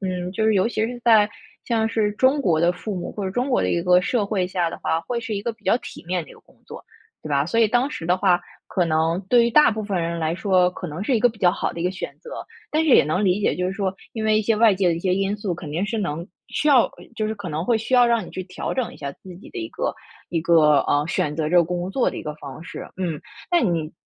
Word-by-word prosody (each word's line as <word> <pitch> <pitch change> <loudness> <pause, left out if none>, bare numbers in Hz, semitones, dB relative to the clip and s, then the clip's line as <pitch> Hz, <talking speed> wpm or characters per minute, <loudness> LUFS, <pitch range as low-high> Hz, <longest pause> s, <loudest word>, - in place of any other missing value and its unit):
嗯， 180 -2 -3
就 220 - -1
是 220 - +3
尤 190 +4 +3
其 220 -2 -1
是 245 +1 -6
在 220 -3 +6 0.4
像 225 -2 +1
是 215 -2 0
中 260 +6 +3
国 165 -9 +2
的 170 +1 +4
父 195 +4 -5
母， 180 - -4
或 205 - -5
者 190 - -2
中 250 +7 -1
国 250 - +3
的 - - 0
一 170 - 0
个 180 0 +5
社 210 +3 0
会 195 -3 -1
下 175 -3 -1
的 - - -7
话， 160 - 0
会 235 +7 -3
是 225 -2 -4
一 200 - -3
个 235 - -2
比 225 -2 -26
较 230 - +4
体 - - -11
面 180 -1 -1
的 155 - -15
一 - - -12
个 - - -16
工 - - -26
作， - - -10 0.4
对 155 - -8
吧？ 140 -1 +2
所 175 +9 -1
以 225 - +6
当 245 +6 +1
时 165 - -6
的 180 +1 +3
话， 180 -2 +3 0.3
可 180 - +1
能 165 +2 +1
对 240 -1 +5
于 235 - +1
大 300 -1 +6
部 215 0 -4
分 200 -4 -2
人 170 0 -2
来 160 +1 0
说， 185 -2 +3
可 180 - -7
能 160 +4 -5
是 250 +3 +1
一 - - +2
个 245 - +5
比 220 - -10
较 180 - +5
好 185 - -2
的 170 - -7
一 - - -1
个 180 - +1
选 190 - -7
择。 485 - -11 0.4
但 315 +1 +1
是 305 - +2
也 - - +7
能 160 +8 0
理 190 +2 +2
解， - - +1
就 180 - -1
是 185 - -2
说 195 -1 -2 0.2
因 220 -2 -4
为 215 0 +3
一 215 - 0
些 225 +2 +2
外 220 0 +5
界 190 -1 0
的 170 - +3
一 165 - -5
些 185 0 0
因 195 +1 0
素， 200 -3 -3
肯 170 -2 -7
定 175 +6 -1
是 220 +1 -2
能 170 -3 -3 0.2
需 300 - -1
要 260 -5 +5 0.3
就 215 - -1
是 220 - -2
可 200 -4 -7
能 155 +2 -3
会 235 - +2
需 225 +4 -5
要 245 -1 +6
让 230 -4 +1
你 - - -11
去 185 - -6
调 185 - -5
整 255 -4 -2
一 - - -13
下 140 -1 -5
自 180 +5 -13
己 200 - -14
的 380 - -7
一 335 -1 -4
个 - - -2 0.4
一 165 -2 -1
个， 155 -3 +5
啊， 145 0 +1
选 150 -2 -1
择 155 -1 -1
这 180 - +2
个 170 - +6
工 175 +2 -3
作 255 +4 +1
的 - - -6
一 - - -5
个 150 - -4
方 140 +2 -9
式， - - -8
嗯。 170 -5 -3 0.3
那 350 -1 +4
你 165 - -1
190 Hz, 330 characters per minute, -23 LUFS, 170-225 Hz, 0.4 s, 也